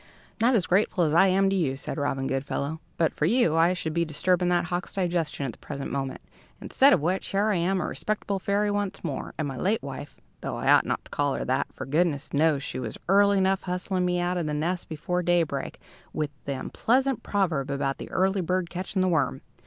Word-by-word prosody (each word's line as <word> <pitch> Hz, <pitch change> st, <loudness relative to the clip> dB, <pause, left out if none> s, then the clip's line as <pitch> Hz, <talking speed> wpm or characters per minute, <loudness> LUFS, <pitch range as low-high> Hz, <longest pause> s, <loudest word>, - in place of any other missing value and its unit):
"Not 240 Hz, +2 st, +4 dB
as 195 Hz, -, +2 dB
grateful 185 Hz, -1 st, +2 dB
as 155 Hz, -2 st, +1 dB
I 180 Hz, +4 st, +6 dB
am 195 Hz, +1 st, +3 dB
to -, -, +1 dB
you," 140 Hz, -8 st, 0 dB
said 140 Hz, -, -5 dB
Robin 135 Hz, -2 st, -1 dB
Goodfellow. 140 Hz, +3 st, -2 dB, 0.2 s
"But 165 Hz, -2 st, +2 dB
for 150 Hz, -, 0 dB
you 210 Hz, -6 st, +3 dB
I 165 Hz, +2 st, +4 dB
should 160 Hz, -3 st, -4 dB
be 170 Hz, +1 st, +2 dB
disturbing 180 Hz, +3 st, +1 dB
that 175 Hz, -1 st, +2 dB
hawk's 180 Hz, +1 st, -3 dB
digestion 170 Hz, -6 st, -1 dB
at 130 Hz, -, -2 dB
the -, -, -18 dB
present 140 Hz, -2 st, -6 dB
moment, 135 Hz, -1 st, -3 dB, 0.4 s
instead 275 Hz, +2 st, +4 dB
of 180 Hz, -, +4 dB
which, 180 Hz, +5 st, -1 dB
here 200 Hz, +2 st, +1 dB
I 205 Hz, -, +2 dB
am, 185 Hz, +3 st, +1 dB
a -, -, -1 dB
respectable 205 Hz, -2 st, -2 dB
fairy 205 Hz, +2 st, +1 dB
once 205 Hz, -1 st, -2 dB
more, 145 Hz, -6 st, -4 dB
and 155 Hz, -, -1 dB
my 135 Hz, -2 st, -5 dB
late 210 Hz, -, 0 dB
wife 140 Hz, +1 st, -8 dB, 0.2 s
(though -, -, -3 dB
I -, -, +2 dB
ought -, -, +5 dB
not -, -, -2 dB
to -, -, -17 dB
call -, -, 0 dB
her 60 Hz, -1 st, -3 dB
that, -, -, 0 dB
for -, -, -7 dB
goodness 150 Hz, +1 st, 0 dB
knows 150 Hz, -1 st, +2 dB
she -, -, -5 dB
was 115 Hz, -4 st, -5 dB
early 200 Hz, +1 st, +5 dB
enough 190 Hz, 0 st, +2 dB
hustling 180 Hz, 0 st, -2 dB
me 180 Hz, 0 st, +1 dB
out 175 Hz, +1 st, 0 dB
of 170 Hz, -3 st, -1 dB
my 150 Hz, -, -2 dB
nest 170 Hz, +4 st, -2 dB
before 180 Hz, +3 st, -2 dB
daybreak, 170 Hz, -5 st, 0 dB, 0.3 s
with 150 Hz, -2 st, -2 dB
the 140 Hz, -1 st, -2 dB
unpleasant 260 Hz, -, +1 dB
proverb 165 Hz, -9 st, 0 dB
about 140 Hz, -1 st, -1 dB
the -, -, -7 dB
early 190 Hz, +1 st, +1 dB
bird 180 Hz, 0 st, -1 dB
catching 185 Hz, +1 st, -2 dB
the -, -, +2 dB
worm!) 160 Hz, -, +1 dB
175 Hz, 225 wpm, -26 LUFS, 150-190 Hz, 0.4 s, I